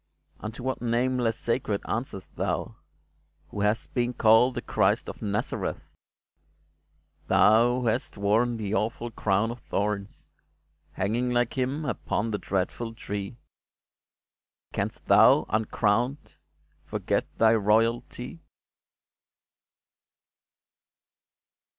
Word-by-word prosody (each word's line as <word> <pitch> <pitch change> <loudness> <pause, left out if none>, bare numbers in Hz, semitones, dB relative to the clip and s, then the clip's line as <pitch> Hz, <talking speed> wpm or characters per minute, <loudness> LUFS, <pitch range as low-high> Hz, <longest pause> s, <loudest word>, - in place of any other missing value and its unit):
Unto 110 +3 -7
what 130 0 -2
name 125 +2 +1
less 115 -2 0
sacred 115 -4 -1
answerest 110 -5 -4
thou - - -2 0.7
Who 105 - -5
hast 105 +3 0
been 120 -1 0
called 115 +3 +5
the 120 - -2
Christ - - +1
of - - -8
Nazareth? 105 0 -2 1.5
Thou 120 +4 +4
who - - -3
hast 115 0 -1
worn 110 +4 +2
the 105 -2 -3
awful 115 +2 -1
crown 105 +1 +1
of 120 - -8
thorns, 100 -2 -3 0.7
Hanging 115 +6 0
like 120 -1 +1
Him 135 +4 -1
upon 115 -4 -2
the 105 - -2
dreatful 100 +5 -2
Tree, 100 +1 -5 1.4
Canst - - -3
thou, - - +6
uncrowned, 110 +5 0 0.5
forget - - -1
thy 115 0 +5
royalty 115 +6 0
115 Hz, 100 wpm, -27 LUFS, 105-120 Hz, 1.5 s, thou